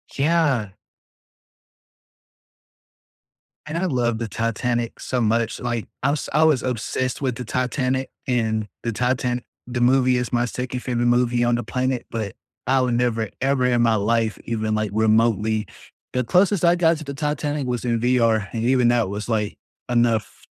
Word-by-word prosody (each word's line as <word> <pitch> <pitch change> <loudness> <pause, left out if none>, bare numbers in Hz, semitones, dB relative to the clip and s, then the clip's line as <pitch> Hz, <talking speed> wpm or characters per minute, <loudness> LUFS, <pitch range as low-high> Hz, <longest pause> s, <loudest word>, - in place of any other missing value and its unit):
Yeah. 140 - +2 3.0
And 155 +2 -4
I 185 - 0
love 120 -7 0
the 115 -1 -3
Titanic 115 +1 -2
so 125 -2 -2
much, 115 +1 +1
like, 120 -2 -3 0.2
I 140 - +3
was 150 - -3
I 155 +2 +4
was 155 -5 +3
obsessed 130 +1 -2
with 130 -3 -1
the 125 -2 -6
Titanic, 130 +2 -1 0.2
and 110 -4 0 0.2
The 115 - -1
Titan 125 +1 -1 0.2
the 120 -1 -3
movie, 125 0 +4
is 125 0 -3
my 120 0 +2
2nd 125 +1 -4
favorite 120 -1 -1
movie 120 0 +2
on 120 0 +2
the 120 - -2
planet, 130 +2 -1
but 110 -4 -4 0.3
I 130 +1 +3
would 125 -2 +1
never, 115 -3 0
ever 130 -1 +2
in 120 -1 +2
my 115 -1 +3
life, 110 +1 0
even 110 -2 -1
like 110 -1 -1
remotely 110 -1 +2 0.5
the 125 - +1
closest 180 - +3
I 170 - +6
got 165 -2 +3
to 155 - -8
the 140 -1 -6
Titanic 150 -1 -2
was 125 -1 -2
in 120 -1 +1
VR, 115 -3 +2
and 115 -1 -3
even 125 0 +3
that 120 -5 +2
was 105 +3 -5
like, 105 -2 -1 0.3
enough. 120 -2 0
120 Hz, 165 wpm, -22 LUFS, 115-130 Hz, 3.0 s, I